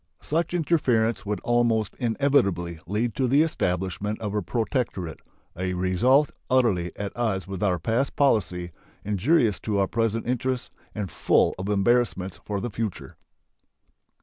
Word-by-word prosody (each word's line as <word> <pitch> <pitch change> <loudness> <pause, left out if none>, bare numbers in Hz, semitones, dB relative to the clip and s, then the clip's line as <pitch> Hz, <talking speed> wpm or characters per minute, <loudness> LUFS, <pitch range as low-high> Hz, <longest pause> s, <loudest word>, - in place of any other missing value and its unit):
Such 165 +3 -1
interference 125 -11 +1
would 105 0 -1
almost 115 -3 +1
inevitably 110 - +1
lead 110 +4 -1
to 130 - +2
the 140 +5 +5
establishment 95 - -2
of 105 -2 -4
a 105 - 0
protectorate 100 - -2 0.4
a 90 +1 -2
result 120 +11 +3 0.2
utterly 110 -10 +2
at 100 -1 -5
odds 105 -6 -1
with 95 -2 -6
our 95 -4 +2
past 115 - -1
policy, 90 -10 +1 0.3
injurious 105 - +2
to 105 -2 -2
our 100 - +3
present 115 +1 -1
interests, 125 +1 -2 0.2
and 100 -5 -4
full - - +3
of 95 +2 -3
embarrassments 100 -2 +1
for 100 -1 -3
the 120 +4 -4
future. 110 -2 -4
110 Hz, 140 wpm, -25 LUFS, 95-125 Hz, 0.4 s, the